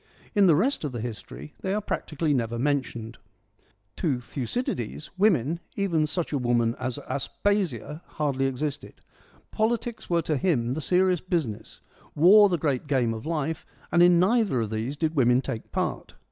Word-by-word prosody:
In 205 Hz, -4 st, +5 dB
the 165 Hz, -, +6 dB
rest 240 Hz, -, +1 dB
of 145 Hz, -4 st, -3 dB
the 120 Hz, -, -4 dB
History 95 Hz, -, -7 dB
they 190 Hz, +1 st, -2 dB
are -, -, +1 dB
practically 155 Hz, -6 st, -2 dB
never 120 Hz, -3 st, -1 dB
mentioned. 120 Hz, -4 st, -2 dB, 0.8 s
To 145 Hz, -8 st, 0 dB
Thucydides, 130 Hz, -, -4 dB
women, 170 Hz, -, +2 dB, 0.2 s
even 170 Hz, -6 st, +1 dB
such 165 Hz, +1 st, -2 dB
a 140 Hz, -, +1 dB
woman 120 Hz, -2 st, +1 dB
as 130 Hz, -1 st, -3 dB
Aspasia, 155 Hz, -, -1 dB, 0.2 s
hardly 135 Hz, -3 st, +1 dB
existed. 145 Hz, +2 st, -4 dB, 0.6 s
Politics 230 Hz, +1 st, -1 dB
were 170 Hz, -1 st, +2 dB
to 155 Hz, -2 st, 0 dB
him 125 Hz, -7 st, +1 dB
the 155 Hz, -, -3 dB
serious 180 Hz, +1 st, +2 dB
business, 145 Hz, -, -3 dB, 0.3 s
war 200 Hz, +7 st, +7 dB
the 175 Hz, -, +1 dB
great 145 Hz, -3 st, -1 dB
game 125 Hz, -5 st, +1 dB
of 110 Hz, +5 st, -7 dB
life, 160 Hz, -1 st, -2 dB, 0.3 s
and 170 Hz, -, +4 dB
in 175 Hz, -1 st, +6 dB
neither 200 Hz, -, +2 dB
of 110 Hz, -1 st, -3 dB
these 115 Hz, +6 st, -3 dB
did 160 Hz, 0 st, 0 dB
women 125 Hz, -2 st, +4 dB
take 115 Hz, -4 st, -5 dB
part. -, -, -3 dB
150 Hz, 160 wpm, -26 LUFS, 120-180 Hz, 0.8 s, war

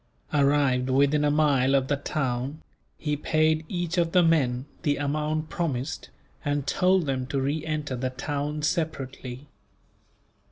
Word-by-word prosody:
Arrived 140 Hz, -3 st, +3 dB
within 140 Hz, +3 st, +3 dB
a 150 Hz, -, +3 dB
mile 140 Hz, -3 st, +3 dB
of 135 Hz, -1 st, +2 dB
the 145 Hz, -, +1 dB
town, 135 Hz, 0 st, -2 dB, 0.4 s
he 150 Hz, -1 st, -1 dB
paid 155 Hz, +1 st, +1 dB
each 175 Hz, -1 st, -1 dB
of 165 Hz, -1 st, +1 dB
the 180 Hz, -1 st, +6 dB
men 135 Hz, -6 st, +2 dB, 0.2 s
the 145 Hz, -1 st, +1 dB
amount 155 Hz, +2 st, -1 dB
promised, 150 Hz, -5 st, -3 dB, 0.3 s
and 145 Hz, -2 st, -1 dB
told 185 Hz, +1 st, +2 dB
them 130 Hz, -2 st, -2 dB
to 140 Hz, 0 st, -1 dB
re 145 Hz, +3 st, -1 dB
enter 150 Hz, -4 st, -2 dB
the 130 Hz, +1 st, -2 dB
town 145 Hz, +3 st, -3 dB
separately. 140 Hz, -5 st, -3 dB
145 Hz, 145 wpm, -26 LUFS, 135-155 Hz, 0.4 s, the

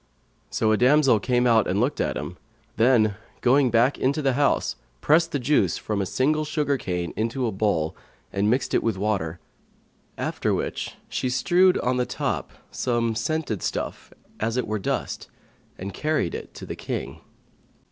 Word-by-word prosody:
So 110 Hz, -, +1 dB
a 110 Hz, -, +3 dB
damsel 130 Hz, -2 st, +5 dB
came 125 Hz, +3 st, +1 dB
out 115 Hz, -2 st, +4 dB
and 95 Hz, +3 st, 0 dB
looked 125 Hz, +6 st, +1 dB
at -, -, -1 dB
him; 90 Hz, -, -6 dB, 0.4 s
then, 110 Hz, -3 st, +3 dB, 0.2 s
going 130 Hz, +1 st, +4 dB
back 120 Hz, +4 st, +3 dB
into 140 Hz, +3 st, +1 dB
the 135 Hz, -1 st, +2 dB
house, 140 Hz, +2 st, +1 dB, 0.2 s
pressed 165 Hz, +3 st, +3 dB
the -, -, 0 dB
juice 125 Hz, -, +2 dB
from 105 Hz, -2 st, -2 dB
a 95 Hz, -, -2 dB
single 155 Hz, +8 st, +1 dB
sugar 150 Hz, -2 st, 0 dB
cane 90 Hz, -8 st, -3 dB
into 115 Hz, +4 st, -1 dB
a 115 Hz, -, 0 dB
bowl 95 Hz, -6 st, 0 dB, 0.4 s
and 100 Hz, +2 st, +1 dB
mixed 125 Hz, +3 st, 0 dB
it -, -, +3 dB
with 115 Hz, -4 st, -1 dB
water; 95 Hz, -5 st, -1 dB, 0.8 s
after -, -, -1 dB
which -, -, -4 dB
she 130 Hz, -, -2 dB
strewed 180 Hz, +8 st, +4 dB
on 125 Hz, +1 st, 0 dB
the 125 Hz, -, 0 dB
top -, -, -2 dB, 0.2 s
some 120 Hz, -2 st, 0 dB
scented 115 Hz, -, -2 dB
stuff, -, -, -4 dB, 0.3 s
as 115 Hz, +3 st, -1 dB
it 125 Hz, -, 0 dB
were 110 Hz, 0 st, -2 dB
dust, -, -, -3 dB, 0.5 s
and 95 Hz, +1 st, -6 dB
carried 155 Hz, -, 0 dB
it -, -, -7 dB
tot -, -, -9 dB
he -, -, -3 dB
King. 70 Hz, +1 st, -5 dB
120 Hz, 170 wpm, -25 LUFS, 105-140 Hz, 0.8 s, damsel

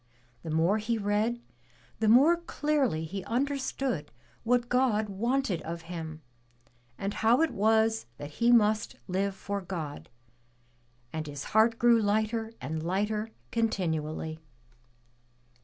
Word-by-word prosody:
The 165 Hz, -, -7 dB
more 165 Hz, +7 st, +2 dB
he 230 Hz, +2 st, -1 dB
read, 215 Hz, +3 st, 0 dB, 0.6 s
the 220 Hz, -, +1 dB
more 270 Hz, +10 st, +7 dB
clearly 295 Hz, -, 0 dB
he 190 Hz, +4 st, -5 dB
understood 265 Hz, -, -2 dB, 0.3 s
what 240 Hz, +1 st, +2 dB
God 240 Hz, -4 st, +2 dB
wanted 225 Hz, -2 st, 0 dB
of 170 Hz, 0 st, -6 dB
him, 160 Hz, -2 st, -7 dB, 0.7 s
and 200 Hz, +1 st, -3 dB
how 235 Hz, +6 st, +3 dB
it 325 Hz, -, +1 dB
was 220 Hz, -, +2 dB
that 145 Hz, +1 st, -7 dB
he 235 Hz, +1 st, +5 dB
must 215 Hz, -2 st, +3 dB
live 195 Hz, +1 st, -1 dB
for 200 Hz, +1 st, -4 dB
God; 165 Hz, -6 st, -6 dB, 1.0 s
and 155 Hz, -1 st, -3 dB
his 145 Hz, -1 st, -6 dB
heart 225 Hz, +1 st, +4 dB
grew 235 Hz, -1 st, +5 dB
Ughter 220 Hz, +2 st, 0 dB
and 155 Hz, +4 st, -4 dB
lighter 210 Hz, +5 st, -1 dB, 0.2 s
continually. 160 Hz, -8 st, -1 dB
210 Hz, 125 wpm, -29 LUFS, 170-235 Hz, 1.0 s, more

